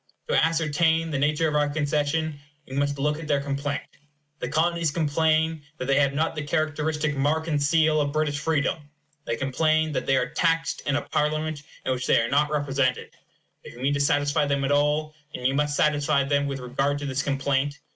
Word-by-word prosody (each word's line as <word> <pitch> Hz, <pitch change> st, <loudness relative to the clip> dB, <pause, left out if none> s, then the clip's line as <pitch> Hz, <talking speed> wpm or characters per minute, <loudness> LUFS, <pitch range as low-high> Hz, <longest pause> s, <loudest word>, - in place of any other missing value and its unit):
To -, -, +2 dB
ascertain 165 Hz, 0 st, +1 dB
the 140 Hz, -, -1 dB
nature 150 Hz, +3 st, +2 dB
of 150 Hz, -, -2 dB
our 150 Hz, -1 st, +2 dB
concession, 150 Hz, +1 st, -1 dB, 0.3 s
we 130 Hz, -, -10 dB
must 145 Hz, 0 st, 0 dB
look 150 Hz, +2 st, 0 dB
at 165 Hz, -, -7 dB
their 145 Hz, -2 st, +2 dB
complaint. 140 Hz, +1 st, -3 dB, 0.6 s
The 125 Hz, -, -3 dB
Colonies 165 Hz, +2 st, +1 dB
complain 160 Hz, +1 st, +1 dB, 0.2 s
that 130 Hz, -, -4 dB
they 135 Hz, +1 st, +3 dB
have 140 Hz, -1 st, +2 dB
not 160 Hz, +3 st, 0 dB
the 155 Hz, -, -4 dB
characteristic 150 Hz, 0 st, -1 dB
mark 150 Hz, +4 st, 0 dB
and 150 Hz, -3 st, 0 dB
seal 155 Hz, +1 st, +3 dB
of 145 Hz, -1 st, -1 dB
British 150 Hz, -1 st, 0 dB
freedom. 150 Hz, -1 st, -1 dB, 0.4 s
They 115 Hz, -, -1 dB
complain 155 Hz, +5 st, +1 dB
that 140 Hz, -, -3 dB
they 135 Hz, -, +3 dB
are 125 Hz, -1 st, -1 dB
taxed 165 Hz, -1 st, 0 dB
in 140 Hz, -, +2 dB
a 145 Hz, -, -1 dB
Parliament 155 Hz, 0 st, -1 dB, 0.2 s
in 130 Hz, -, 0 dB
which 130 Hz, 0 st, -2 dB
they -, -, +5 dB
are 115 Hz, 0 st, 0 dB
not 145 Hz, +2 st, +3 dB
represented. 135 Hz, -3 st, 0 dB, 0.5 s
If -, -, -11 dB
you -, -, -12 dB
mean 135 Hz, +3 st, +1 dB
to 140 Hz, -, -1 dB
satisfy 145 Hz, +1 st, +2 dB
them 140 Hz, -1 st, 0 dB
at 135 Hz, -, 0 dB
all, 150 Hz, +1 st, +1 dB, 0.2 s
you 125 Hz, +2 st, 0 dB
must 145 Hz, +1 st, 0 dB
satisfy 145 Hz, -1 st, +2 dB
them 140 Hz, +1 st, +1 dB
with 135 Hz, -1 st, -4 dB
regard 135 Hz, +3 st, -1 dB
to 145 Hz, -, -5 dB
this 135 Hz, 0 st, -1 dB
complaint. 140 Hz, 0 st, -1 dB
145 Hz, 200 wpm, -25 LUFS, 140-155 Hz, 0.6 s, they